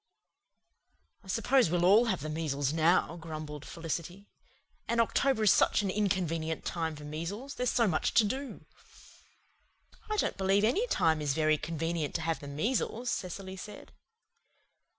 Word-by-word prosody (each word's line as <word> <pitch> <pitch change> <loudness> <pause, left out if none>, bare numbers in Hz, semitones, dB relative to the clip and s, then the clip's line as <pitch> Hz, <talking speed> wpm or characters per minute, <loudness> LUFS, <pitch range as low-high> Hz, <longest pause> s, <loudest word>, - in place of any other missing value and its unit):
"I - - -18
suppose 230 +3 +2
we'll 175 +1 +1
all 210 +6 +6
have 190 - -1
the 155 - -4
measles 145 -3 -1
now," 165 +1 +2
grumbled 155 -3 -7
Felicity. 170 +4 -5 0.6
"And 235 0 0
October 230 +1 +2
is 210 - +6
such - - +3
an 195 - 0
inconvenient 175 -6 -1
time 160 -2 -2
for 150 - -10
measles 170 - -5
there's 250 -1 -1
so 235 -2 +2
much 160 -5 0
to 230 - +7
do." 265 +6 -4 1.4
"I 430 - -1
don't - - 0
believe 195 +1 +2
any 380 - +2
time 160 - +2
is 145 -2 0
very 155 -1 +2
convenient 165 -1 -3
to 165 - 0
have 165 0 -1
the 145 - -9
measles," 230 - -1
Cecily 190 0 -5
said. 205 +2 -10
175 Hz, 150 wpm, -30 LUFS, 155-215 Hz, 1.4 s, to